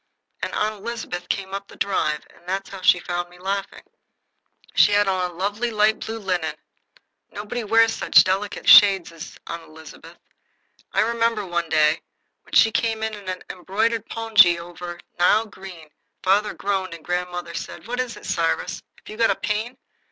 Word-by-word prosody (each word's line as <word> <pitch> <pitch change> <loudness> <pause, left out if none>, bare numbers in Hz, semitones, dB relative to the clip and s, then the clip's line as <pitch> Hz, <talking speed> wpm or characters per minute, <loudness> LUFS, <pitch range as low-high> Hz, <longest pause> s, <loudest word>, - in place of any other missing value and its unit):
And - - -3
Aunt 215 0 -1
Elizabeth 225 -7 -5
came 195 -1 -3
up 200 0 -5
the - - -14
drive, 155 -6 -1
and 175 - -22
that 195 +1 -2
is - - -13
how 195 - -8
she 180 -1 +5
found 175 0 -4
me 180 - -17
laughing. 195 +2 -4 0.9
She 210 - +5
had 205 0 +3
on 185 -2 0
a - - -13
lovely 205 +6 -2
light 215 0 +2
blue 225 0 -5
linen. 180 -7 -2 0.7
Nobody 215 +4 -5
wears 225 +1 +4
such - - +5
delicate 195 +2 -2
shades 195 -5 +8
as 165 0 -10
Aunt 170 0 -6
Elizabeth. 160 0 -14 0.7
I - - +2
remember, 230 -2 0
one 170 -2 -2
day, 155 0 +3 0.4
when - - -23
she 225 - +6
came 225 -1 -1
in 220 0 -2
an 185 -3 -6
embroidered 220 +5 -1
pongee 215 -6 +5
over 175 0 -8 0.2
Nile 210 +5 +4
green, 185 -7 -12 0.3
father 205 +3 +2
groaned, 190 -3 -2
and 165 - -15
grandmother 180 0 -3
said: - - -7
"What 245 +1 -3
is 255 -2 -3
it, - - -12
Cyrus? - - -1 0.2
Have - - -22
you 215 - -9
got 230 0 +3
a - - +2
pain?" 220 +4 -3
195 Hz, 175 wpm, -23 LUFS, 175-220 Hz, 0.9 s, shades